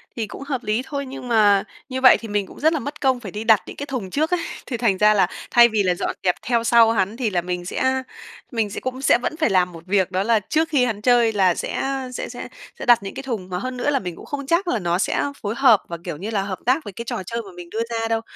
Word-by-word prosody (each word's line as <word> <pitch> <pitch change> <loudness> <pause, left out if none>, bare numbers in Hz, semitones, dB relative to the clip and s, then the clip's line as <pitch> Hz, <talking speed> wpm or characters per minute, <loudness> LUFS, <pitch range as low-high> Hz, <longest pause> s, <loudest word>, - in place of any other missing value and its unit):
Thì 225 -3 -3
cũng 275 - -9
hợp 275 -3 -3
lý 215 +3 0
thôi, 280 -2 -4
nhưng 260 -1 -8
mà 210 -4 +4 0.3
như 260 0 -3
vậy 260 - +8
thì 230 - -8
mình 205 -2 -1
cũng - - -13
rất 315 +2 +3
là 310 - 0
mất 285 +3 -7
công 260 -2 +2
phải 205 -7 -8
đi 210 +1 -5
đặt 220 -2 +5
những - - -9
cái 285 - -5
thùng 255 -9 -4
trước 310 - 0
ấy. 360 - +2 0.3
Thì 245 - -4
thành 225 -5 +1
ra 210 +2 +5
là 195 -3 +3 0.2
thay 240 0 +7
vì 215 -2 +1
là 180 -2 +1
dọn - - -3
dẹp 180 -1 +2
theo 235 -1 0
sau 230 -1 +5
hắn 205 +1 0
thì 240 -5 0
là 175 -3 0
mình 180 0 -4
sẽ 260 +7 0 0.5
mình 225 -4 0
sẽ - - -5
cũng 260 +1 -5
sẽ 270 - +5
vẫn 310 - -3
phải 310 -8 +2
làm 180 -2 +2
một 165 - -11
việc 190 -1 +1
đó 185 +1 0
là 225 0 +3
trước 315 +10 0
khi 265 -5 +3
hắn 215 -4 -3
chơi 240 -1 +4
là 190 -4 +3
sẽ - - -3 0.3
sẽ - - -5
sẽ - - -7 0.3
sẽ - - -5
đặt 240 -4 +5
những 195 - -6
cái 270 - -6
thùng, 215 -8 -4
mà 180 - -3
hơn 255 +4 -5
nữa 245 - 0
là 275 -2 +2
mình 180 -3 -6
cũng - - -12
không 280 -1 -5
chắc 345 +4 +1
là 240 - 0
nó 175 -1 0
sẽ - - 0 0.2
phối 210 +2 -3
hợp 245 -7 +5
và, 170 - -5
kiểu 170 -4 -5
như 200 +6 -5
là, 200 -3 0
hợp 190 -2 -5
tác 260 +6 +2
với 205 - -8
cái 235 +4 -7
trò 190 - -4
chơi 235 +5 -3
mà 200 - -12
mình 175 -1 -10
đưa 225 +4 -3
ra 225 -1 -2
đâu. 225 0 0
225 Hz, 300 wpm, -22 LUFS, 195-260 Hz, 0.5 s, vậy